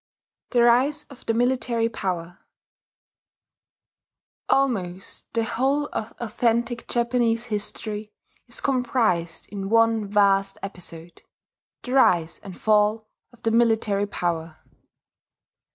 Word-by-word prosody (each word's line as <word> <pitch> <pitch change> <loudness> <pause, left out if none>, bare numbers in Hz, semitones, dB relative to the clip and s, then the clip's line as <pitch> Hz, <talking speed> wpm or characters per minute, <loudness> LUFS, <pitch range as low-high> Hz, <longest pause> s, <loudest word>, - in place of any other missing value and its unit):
THE 240 -2 +3
RISE 250 +5 +3
OF 265 - -14
THE 225 - +1
MILITARY 240 -1 +1
POWER 180 -5 -4 2.1
Almost 195 -9 -1
the 230 - +2
whole 275 +6 0
of 220 - -4
authentic 235 +1 -1
Japanese 235 -1 +1
history 210 -1 -4 0.4
is - - -6
comprised 230 -11 0
in 195 -1 -5
one 225 -1 +3
vast 195 -1 +3
episode: 175 -3 -9 0.6
the 250 - -6
rise 175 -11 +3
and 190 -3 -10
fall 215 0 +2 0.2
of 240 -1 -22
the 225 - +1
military 220 -3 +2
power.... 165 -4 -3
225 Hz, 105 wpm, -24 LUFS, 195-240 Hz, 2.1 s, THE